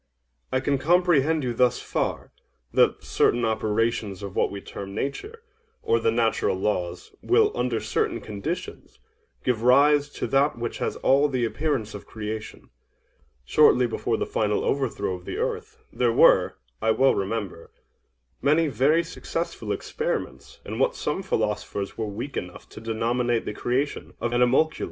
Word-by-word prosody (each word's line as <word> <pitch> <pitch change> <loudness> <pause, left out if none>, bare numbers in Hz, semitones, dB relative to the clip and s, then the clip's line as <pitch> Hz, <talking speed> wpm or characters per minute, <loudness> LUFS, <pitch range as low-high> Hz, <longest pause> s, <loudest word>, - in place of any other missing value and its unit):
OINOS. 130 - +2
I - - +2
can 140 0 +1
comprehend 160 -1 +3
you 125 -2 -1
thus 125 +1 +3
far—that - - -2
certain 120 0 +2
operations 110 -2 -1
of 100 -1 -7
what - - +2
we 100 - -6
term 100 0 -8
Nature, 415 - -4 0.4
or 115 - +2
the 115 - +2
natural 115 -4 +1
laws, 90 -3 -2
will, 425 +2 +3
under - - 0
certain 440 0 -1
conditions, - - -6 0.5
give 125 -4 0
rise 145 +4 +5
to - - -4
that 140 -1 +2
which 120 0 -4
has - - -2
all 140 +2 +4
the 130 -3 0
appearance 130 -4 -2
of 105 - -9
creation. 110 0 -7 0.7
Shortly 125 - +5
before 115 0 -1
the - - -1
final 105 -1 0
overthrow 135 -8 -1
of 90 -1 -8
the - - -5
earth, - - -3 0.2
there 120 -2 +2
were, - - +5 0.3
I 110 - +1
well 130 +4 +4
remember, 100 -4 -4 0.7
many 155 +2 +3
very 150 +5 +3
successful 165 0 -4
experiments 475 0 -4
in - - -5
what - - +2
some 190 - -2
philosophers 105 - -2
were 110 -1 -3
weak 120 +7 -6
enough 90 -1 -6
to - - -11
denominate 115 +1 0
the - - -3
creation 130 +6 -2
of 120 - -2
animalculæ. 125 +6 +3
120 Hz, 150 wpm, -25 LUFS, 110-145 Hz, 0.7 s, rise